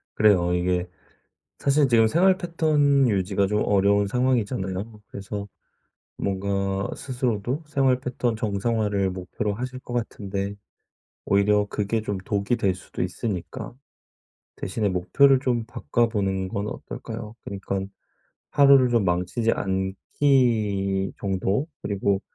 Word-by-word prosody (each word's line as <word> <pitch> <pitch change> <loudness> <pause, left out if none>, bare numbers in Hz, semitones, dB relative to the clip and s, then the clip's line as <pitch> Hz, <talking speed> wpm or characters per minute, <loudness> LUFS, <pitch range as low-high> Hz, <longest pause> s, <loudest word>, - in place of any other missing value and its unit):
그래요. 95 -5 +4
이게 90 0 0 0.7
사실 140 +1 +3
지금 115 -3 +5
생활 185 +9 +4
패턴 150 -6 +2
유지가 100 -1 +1
좀 105 +1 +1
어려운 100 0 +3
상황이잖아요. 110 -4 -1
그래서 100 +1 -6 0.7
뭔가 100 0 -1
스스로도 125 +1 -2
생활 135 -4 +2
패턴 125 -2 -1
정상화를 105 -2 0
목표로 95 +3 -3
하실 125 +3 -5
것 125 - -10
같은데 100 -4 -3 0.7
오히려 105 +1 +3
그게 105 +2 -1
좀 105 -2 -3
독이 100 +4 0
될 95 -5 +1
수도 90 - -7
있으니까 90 -2 -4 0.8
대신에 105 +2 -1
목표를 100 +10 +4
좀 120 -4 0
바꿔보는 105 - -1
건 100 +2 -3
어떨까요? 105 0 -7
그니깐 95 -1 -4 0.6
하루를 140 -3 +6
좀 115 -3 +2
망치지 90 +6 +1
않기 100 0 +1
정도 100 +7 0
그리고 100 -1 0
105 Hz, 270 characters per minute, -24 LUFS, 95-125 Hz, 0.8 s, 하루를